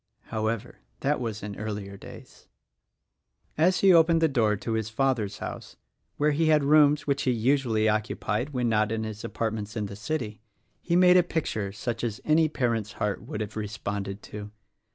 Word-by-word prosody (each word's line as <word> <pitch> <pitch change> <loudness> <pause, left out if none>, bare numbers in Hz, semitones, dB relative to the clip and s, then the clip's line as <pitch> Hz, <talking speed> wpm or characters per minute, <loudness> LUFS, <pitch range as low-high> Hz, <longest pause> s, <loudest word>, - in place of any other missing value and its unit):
However, 110 0 -2 0.2
that 145 +2 +1
was 110 -4 -4
in 105 -1 -5
earlier 105 -2 -5
days. 100 - -13 1.1
As 180 +4 +3
he 195 -2 +7
opened 165 0 +5
the 165 - +4
door 115 -7 +2
to 105 +3 -5
his 110 -1 -1
father's 110 -4 0
house - - -7 0.4
(where 150 +1 +3
he 160 +2 +1
had 155 -2 +4
rooms 150 0 +5
which 140 -1 0
he 130 - +2
usually 120 -2 +2
occupied 110 +3 -1
when 125 -4 -1
not 110 -1 +2
in 110 0 -1
his 110 -1 -6
apart 110 -1 -2
ments 110 +1 -5
in 105 - -1
the 100 0 -7
city) 110 -1 -4 0.4
he 170 - 0
made 180 0 +7
a - - +7
picture 145 - -2
such 115 +3 -4
as 115 -3 -2
any 155 +1 +4
parent's 115 -7 -1
heart 105 -1 -2
would 105 - -6
have 105 0 -5
responded 100 -2 -4
to. 105 0 -8
115 Hz, 180 wpm, -27 LUFS, 105-145 Hz, 1.1 s, he